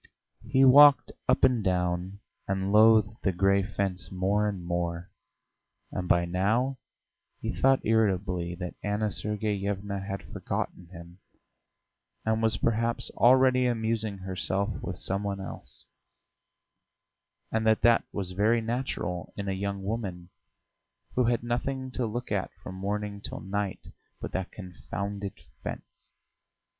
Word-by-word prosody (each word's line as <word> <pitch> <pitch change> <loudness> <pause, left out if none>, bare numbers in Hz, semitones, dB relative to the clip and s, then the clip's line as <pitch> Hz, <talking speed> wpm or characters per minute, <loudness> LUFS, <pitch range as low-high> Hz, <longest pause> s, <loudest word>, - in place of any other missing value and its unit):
He 135 0 +4
walked 145 +2 +8 0.2
up - - +3
and 120 -4 +4
down, 90 +1 -1 0.3
and 95 0 -1
loathed 110 +1 +5
the 95 - +1
grey 95 +2 +3
fence 95 -3 -3
more 100 +3 +1
and 95 -4 -6
more, 85 0 -2 0.8
and 90 -1 -3
by 85 0 +4
now 110 +9 0 0.6
he - - -3
thought 135 0 +3
irritably 95 -5 +1
that 90 0 -5
Anna 105 +1 -1
Sergeyevna 100 -1 -2
had 95 0 -5
forgotten 90 - -4
him, 85 0 -12 1.1
and 110 0 +1
was 110 -1 +2
perhaps 115 +1 0
already 130 0 +5
amusing 110 -3 -1
herself 95 +2 -2
with - - -4
some 95 +1 -2
one 100 -1 -3
else, 95 - -9 1.7
and 110 0 0
that 110 -1 +3
that 115 0 +5
was 95 -3 -3
very 105 +5 +3
natural 115 -7 -3
in 100 -1 -4
a - - 0
young 100 0 -3
woman 95 -5 -4 0.8
who 125 - +2
had 120 -1 +1
nothing 130 +2 -2
to 125 -2 -1
look 120 +3 -5
at 100 -2 0
from 90 +1 -9
morning 100 +2 -3
till - - -6
night 100 0 -4 0.3
but - - -6
that 95 -1 -3
confounded 100 +1 -5 0.3
fence. - - -8
100 Hz, 130 wpm, -28 LUFS, 95-110 Hz, 1.7 s, walked